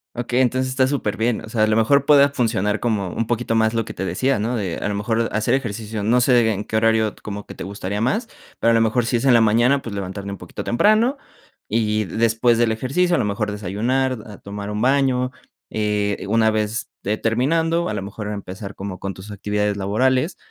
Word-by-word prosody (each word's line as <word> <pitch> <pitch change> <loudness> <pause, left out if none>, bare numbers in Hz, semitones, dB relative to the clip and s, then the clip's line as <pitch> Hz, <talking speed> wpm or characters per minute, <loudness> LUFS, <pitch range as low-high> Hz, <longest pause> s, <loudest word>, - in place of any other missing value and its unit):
Okey, 125 +1 0
entonces 130 +1 +1
está 130 0 +2
superbien. 115 -4 -1
O - - -12
sea, 110 -1 0
a 110 - +4
lo 110 - +2
mejor 140 +5 +3
puede 140 -1 +6
funcionar 110 -6 0
como 105 -6 -1
un 115 - -2
poquito 120 -1 -1
más 110 0 +2
lo 115 -1 0
que - - -7
te 95 - -5
decía, 115 +8 0
¿no?, 120 +4 -1
de 95 -6 -2
a - - -3
lo 105 - -1
mejor 115 +3 0
hacer 110 0 0
ejercicio, 110 -4 -3
no 120 +4 +3
sé 120 -2 +4
en 105 0 -3
qué - - -5
horario 110 -1 +2
como 105 -1 -6
que - - -10
te - - -7
gustaría 100 +1 -4
más, 215 - 0 0.3
pero 115 - +3
a - - +3
lo 115 - +4
mejor 115 +1 +2
si 120 - 0
es 115 - -3
en 135 - +6
la 120 - +6
mañana, 120 +5 +3
pues, 110 -3 -6
levantarme 100 +1 -5
un 100 - -7
poquito 90 - -8
temprano. 215 - +3 0.5
Y 110 -1 +1
y - - 0
después 115 +4 +2
del 115 -1 +2
ejercicio, 175 +10 +1
a - - +1
lo - - +1
mejor 105 +1 -1
desayunar, 115 +6 -1
a 105 -2 -10
tomar 100 0 -7
un 105 +1 -3
baño. 130 -1 +2 0.4
Eh, 105 -2 -1
una 110 +1 +3
vez, 110 +1 -2 0.2
eh, 105 - +1
terminando, 165 +9 +1
a 110 - -2
lo 105 - -3
mejor 100 +2 -6
empezar 100 -1 -6
como 95 -1 -6
con 100 0 -4
tus 95 +3 -11
actividades 105 0 -1
laborales. 130 - +1
110 Hz, 225 wpm, -21 LUFS, 105-125 Hz, 0.5 s, puede